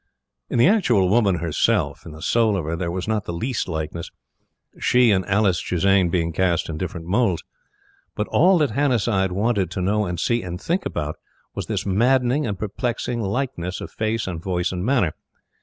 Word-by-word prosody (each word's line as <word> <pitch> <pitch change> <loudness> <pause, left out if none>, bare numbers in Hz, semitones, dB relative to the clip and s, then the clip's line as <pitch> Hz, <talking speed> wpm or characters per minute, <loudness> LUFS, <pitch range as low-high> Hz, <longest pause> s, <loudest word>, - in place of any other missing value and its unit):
In - - -1
the 120 - +6
actual 125 - +3
woman 100 -3 +3
herself 85 -2 0
in - - -8
the 80 +1 -10
soul 110 -4 +2
of 85 - -3
her 80 +2 -2
there 85 0 -3
was 90 +3 -4
not 110 -3 -1
the - - -4
least 115 +9 -2
likeness; 80 0 -4 0.7
she 125 -2 +4
and 95 -2 +2
Alice 100 -3 +2
Chisane 95 0 +2
being 85 -1 0
cast 85 -1 +1
in 80 - -4
different 85 -2 -5
moulds. 95 -1 +1 0.7
But 105 - -2
all 180 +3 +5
that 150 -4 +1
Hannasyde 115 -9 +1
wanted 100 -1 0
to 95 - -5
know 105 +2 +1
and 90 -1 -3
see 120 0 +1
and 90 -1 -6
think 175 - -1
about, 75 +1 -4 0.4
was - - -5
this - - -2
maddening 125 +7 +2
and 100 -3 -3
perplexing 120 +3 -3
likeness 100 -5 -3
of - - -7
face 110 +1 -1
and 85 -4 -5
voice 90 -1 -1
and 90 -1 -3
manner. 110 - +2
100 Hz, 190 wpm, -22 LUFS, 90-120 Hz, 0.7 s, the